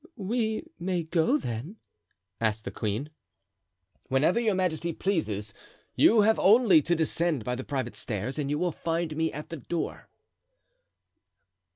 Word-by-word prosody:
"We 220 - -1
may 180 -1 -1
go, 160 -2 +2
then?" 125 - -5 0.6
asked 110 -1 0
the - - -4
queen. 110 +8 -3 1.0
"Whenever 150 - +2
your 220 -4 +1
majesty 170 -2 -1
pleases. 110 - -1 0.4
You 220 -1 +6
have 220 +2 +3
only 200 -5 +6
to 175 +4 +1
descend 160 -3 0
by 125 - -1
the 125 +1 -4
private 135 -2 -3
stairs 120 +6 -3
and 140 -2 -1
you 150 - 0
will 175 +2 0
find 165 0 -2
me 160 +1 0
at 150 +1 -8
the 165 - -5
door." 160 +5 -4
160 Hz, 145 wpm, -28 LUFS, 130-185 Hz, 1.0 s, You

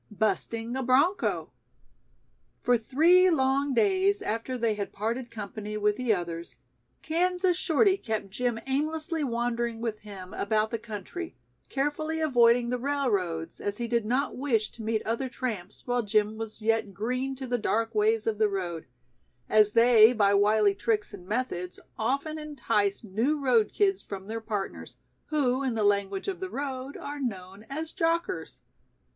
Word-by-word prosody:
"Busting 225 +2 -1
a 265 - -1
Broncho." 275 +10 +2 1.1
For 245 - +4
three 325 +11 +5
long 275 -3 +2
days 395 - +3
after 240 - -2
they 230 -2 +1
had 205 -1 -4
parted 235 +4 -3
company 210 -1 -6
with 210 0 +2
the 250 -1 0
others, 170 -3 -3 0.5
Kansas 360 +2 +1
Shorty 375 +3 +3
kept 215 - -4
Jim 240 +2 -1
aimlessly 310 +4 -1
wandering 235 -2 -1
with 225 -2 -3
him 195 -2 -10
about 215 +1 0
the 230 - -2
country, 230 - -7 0.3
carefully 310 +3 -1
avoiding 240 -5 +4
the 250 - -1
railroads, 205 -12 -1
as 205 0 -3
he 235 - -2
did 235 -1 +1
not 250 +6 0
wish 240 -6 0
to 235 - -11
meet 220 0 -1
other 235 +4 -1
tramps 220 -7 -5
while 245 0 +1
Jim 210 0 +1
was 220 0 -7
yet 220 -3 +1
"green" 255 +6 -2
to 265 0 -6
the 245 -1 -1
dark 225 +2 0
ways 220 +1 +2
of 220 -2 -1
the 215 -1 +4
road, 175 -4 -4 0.6
as 210 -1 +4
they 230 -1 +7
by 200 -3 +3
wily 205 0 +4
tricks 420 - -1
and 185 -3 -10
methods 205 -6 -3 0.2
often 280 +7 -1
entice 230 -10 -1
new 230 +9 0
road 240 -6 +3
kids 390 -2 +2
from 195 -1 -7
their 225 +2 -5
partners, 210 -3 -5 0.3
who 270 -4 +1
in 260 -4 -1
the 220 - 0
language 200 -1 +1
of 380 -3 -3
the 375 0 -4
road 270 -2 -4
are 290 +1 -6
known 195 -5 -5
as 315 +3 -4
"jockers". 335 -1 -1
235 Hz, 160 wpm, -28 LUFS, 210-280 Hz, 1.1 s, they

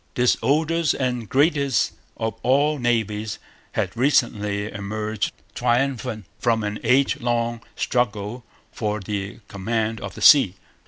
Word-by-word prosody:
This 125 0 +4
oldest 160 +3 +2
and 125 -4 -2
greatest 140 -3 +2 0.3
of 110 -1 -2
all 145 +4 +2
navies 110 -3 0 0.4
had - - -1
recently 105 -6 +1
emerged 105 +1 -3 0.2
triumphant 120 -3 0
from 115 -2 +1
an 105 0 -3
age 130 +4 +3
long 120 -1 0
struggle 115 -1 -1 0.3
for 105 -1 -2
the 100 +2 -5
command 110 +2 -2
of - - -6
the - - -9
sea. 130 - +7
115 Hz, 120 wpm, -23 LUFS, 105-130 Hz, 0.4 s, sea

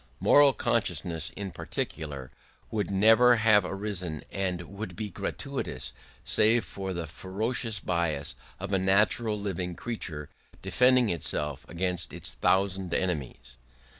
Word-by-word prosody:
Moral 145 -1 +6
consciousness 85 -8 0
in 100 -2 -4
particular 70 -6 -5 0.4
would 105 -2 -1
never 110 +5 +6
have 110 -2 +5
arisen 90 -5 -3
and 90 -3 -2
would 100 +1 -7
be 105 0 -5
gratuitous, - - -4 0.3
save 115 +2 +4
for 95 -1 -5
the 85 -2 -3
ferocious 105 +7 -1
bias 85 -6 -1 0.3
of 100 +1 -4
a 95 - +3
natural 105 +3 +2
living 90 -3 -3
creature, 80 -11 -5 0.4
defending 125 -3 +4
itself 75 -3 -2
against 90 -1 -1
its - - -2
thousand 95 -1 +1
enemies. 65 -8 -3
95 Hz, 120 wpm, -28 LUFS, 85-105 Hz, 0.4 s, Moral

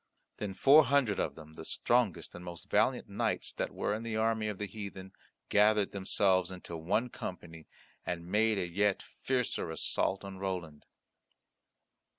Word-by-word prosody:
Then 100 -2 -4
four 145 +6 +7
hundred 130 -6 +2
of - - -1
them, 80 -1 -12
the - - -9
strongest 120 -7 0
and 90 - -9
most 85 -1 -9
valiant - - +2
knights - - -2
that - - -3
were - - -1
in 110 - -3
the 115 -1 -4
army 110 -1 +1
of 105 -2 -3
the 105 - -3
heathen, 95 -2 -8 0.4
gathered 105 0 +4
themselves 95 -2 +2
into 90 -2 -7
one 95 +10 0
company, 80 -6 -8 0.4
and 85 -1 -4
made 105 +3 +2
a 95 - 0
yet 100 +3 +1
fiercer 125 -9 -2
assault 95 +4 0
on 95 -1 -8
Roland. 90 -6 -5
100 Hz, 160 wpm, -32 LUFS, 90-110 Hz, 0.4 s, four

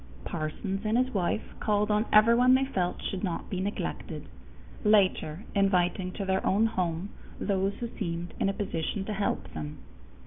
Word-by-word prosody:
Parsons 180 +5 -3
and 220 +2 +2
his 255 +1 +1
wife 195 +2 0 0.2
called 210 0 +1
on 210 +2 +2
everyone 235 +4 +6
they 265 +1 +3
felt 185 -9 -1
should 190 0 -3
not 175 -4 -3
be 185 - -1
neglected, 205 +2 -4 0.6
later 195 -5 +3
inviting 185 -2 +2
to 200 - -4
their 190 0 +1
own 210 +4 +3
home 180 -3 -1 0.3
those 195 0 0
who 235 - -4
seemed 170 -3 -3
in - - +2
a - - 0
position 195 0 -2
to 215 - -3
help 200 0 -2
them. 75 -1 -5
195 Hz, 165 wpm, -29 LUFS, 180-215 Hz, 0.6 s, everyone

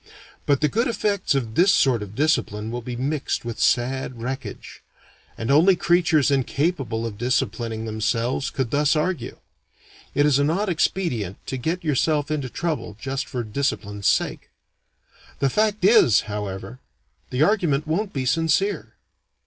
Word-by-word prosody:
But 140 -2 +2
the 150 - +4
good 230 +9 0
effects 205 - 0
of 115 -5 -2
this 180 - +5
sort 130 - +3
of 105 0 -8
discipline 115 -7 0
will 120 +1 -4
be 120 +1 -6
mixed 135 +1 -2
with 115 -1 -5
sad 125 0 0
wreckage. 130 +4 -6 0.6
And 115 +4 -2
only 170 +7 +6
creatures 170 -4 +3
incapable 135 -3 0
of 105 -3 -6
disciplining 115 -2 -1
themselves 115 +4 -1
could 130 -3 -3
thus 145 +1 +2
argue. 155 -5 -2 0.8
It 145 - +4
is 145 -2 +3
an 145 +1 +2
odd 195 +5 0
expedient 130 - -1
to - - -4
get 160 +8 -2
yourself 150 0 +1
into 140 -4 -2
trouble 155 - -3
just 135 +2 -3
for 125 -2 -3
discipline's 105 -4 -2
sake. - - 0 0.9
The 135 -1 +1
fact 210 0 +1
is, 200 - +6
however, 105 +3 -6 0.5
the 125 +4 +1
argument 160 -7 +2
won't 190 +6 -1
be 135 -2 -3
sincere. 165 +8 0
135 Hz, 150 wpm, -23 LUFS, 115-165 Hz, 0.9 s, only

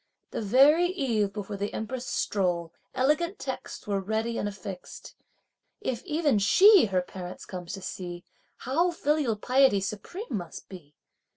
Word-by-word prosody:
The - - -3
very 275 - +5
eve 240 - 0
before 205 0 -5
the 205 +1 -3
Empress' 245 +3 -4
stroll, 175 -4 -1 0.2
elegant 305 +8 +1
texts - - -6
were 200 -1 0
ready 220 +4 -2
and 205 - -1
affixed. 195 -2 -9 0.7
If 255 - -3
even 300 - +2
she 385 - +7
her 185 -3 0
parents 180 0 -8
comes 180 -1 -7
to 195 -1 -7
see, 175 -2 -6 0.3
how 325 +8 +1
filial 295 -7 0
piety 255 0 +3
supreme 210 - -5
must 175 -6 -5
be! 155 -6 -12
215 Hz, 145 wpm, -27 LUFS, 190-285 Hz, 0.7 s, she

